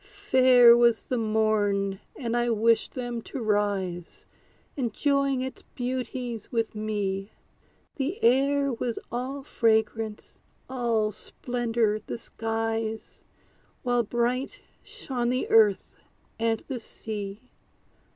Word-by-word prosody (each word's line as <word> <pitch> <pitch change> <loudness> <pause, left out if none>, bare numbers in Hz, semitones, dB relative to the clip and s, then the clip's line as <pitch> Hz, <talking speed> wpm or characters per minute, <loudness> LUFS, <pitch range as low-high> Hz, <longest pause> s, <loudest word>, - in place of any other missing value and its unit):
Fair 260 -13 +6
was 235 -1 +4
the 255 - -2
morn, 210 -3 +1 0.2
and 235 -2 -3
I 240 0 +1
wished 230 0 +2
them 240 -2 -3
to 270 - -7
rise, 200 -5 -1 0.5
Enjoying 275 +2 +1
its 260 0 -5
beauties 245 -2 -4
with 230 -2 -1
me. 205 -2 -3 0.6
The 295 +8 -2
air 275 +2 +3
was 235 0 -3
all 260 +3 -4
fragrance 220 -3 0 0.3
all 235 -4 0
splendor 225 0 -1
the - - -5
skies, 225 -1 -3 0.6
While 245 -2 +2
bright 240 +3 -1 0.2
shone 245 -3 -3
the 255 +1 0
earth 215 -3 +4 0.5
and 225 -1 0
the 265 -3 -4
sea. 215 +1 -7
230 Hz, 105 wpm, -27 LUFS, 215-255 Hz, 0.6 s, Fair